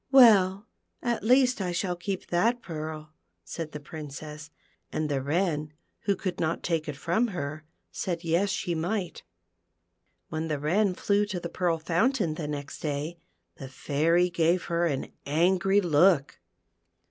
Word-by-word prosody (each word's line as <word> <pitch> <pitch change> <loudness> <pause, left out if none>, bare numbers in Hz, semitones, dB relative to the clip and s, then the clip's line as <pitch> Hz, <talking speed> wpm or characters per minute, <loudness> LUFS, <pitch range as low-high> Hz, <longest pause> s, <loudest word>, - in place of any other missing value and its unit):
"Well, 210 -5 +6 0.4
at 240 -2 -1
least 250 0 +4
I 180 -2 -1
shall 180 +1 -1
keep 185 +2 -4
that 230 +8 +2
pearl," 155 -1 -6 0.3
said 155 - -6
the 150 - -6
Princess, 150 +1 -8 0.4
and 155 -1 -1
the 140 -2 0
Wren, 150 0 -1 0.3
who 200 -1 +2
could 185 -1 -4
not 160 0 -1
take 165 -3 -1
it 145 - -4
from 170 +11 +1
her, 155 -6 -5 0.3
said, 170 -2 -3
yes, 170 +4 +2
she 190 -2 -1
might. 175 +1 -2 1.1
When 160 +1 -3
the 155 -2 -1
Wren 180 +7 +1
flew 205 +2 +1
to 190 -3 -3
the 170 - -5
Pearl 170 -1 0
Fountain 175 - +1
the 155 -1 -5
next 145 -1 -5
day, 150 +3 -3 0.4
the 135 - -7
Fairy 165 +7 +1
gave 170 +2 +2
her 170 0 +1
an 140 -4 -3
angry 185 +6 +3
look. 155 -4 +3
170 Hz, 150 wpm, -28 LUFS, 155-190 Hz, 1.1 s, Well